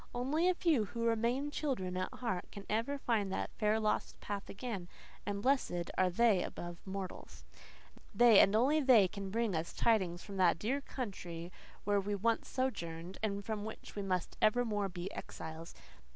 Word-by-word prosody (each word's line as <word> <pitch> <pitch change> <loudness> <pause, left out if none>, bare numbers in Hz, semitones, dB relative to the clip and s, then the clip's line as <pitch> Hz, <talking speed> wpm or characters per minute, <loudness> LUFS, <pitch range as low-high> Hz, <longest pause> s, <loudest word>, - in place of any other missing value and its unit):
Only 300 +9 +2
a 365 - +2
few, 310 -12 +2
who 230 +3 -3
remain 235 +5 +1
children 240 -13 -2
at 185 0 -2
heart, 190 -8 -3
can 200 - -9
ever 230 +7 0
find 220 -7 0
that - - -2
fair, 215 0 +3
lost 215 -1 -1
path 200 -1 -5
again; 200 -4 -5 0.4
and 200 0 -2
blessed 250 -10 +1
are 185 -1 +3
they 205 0 +4
above 175 -1 -5
mortals. 190 -1 -6 0.7
They, 235 -4 +7
and 195 - +6
only 270 +7 +4
they, 250 -9 +6
can 195 +1 -6
bring 225 0 0
us 160 +1 -2
tidings 185 -7 +1
from 200 -2 -7
that 180 -3 +4
dear 255 +10 -1
country 180 -10 -6 0.3
where 205 0 +2
we 205 +1 -2
once 225 +3 +1
sojourned 175 -9 -3
and 200 -2 -2
from 215 -2 -3
which 220 +1 -8
we 205 - -2
must 185 -3 -2
evermore 215 -3 +2
be 180 +1 -6
exiles. 160 +1 -7
205 Hz, 170 wpm, -34 LUFS, 185-235 Hz, 0.7 s, They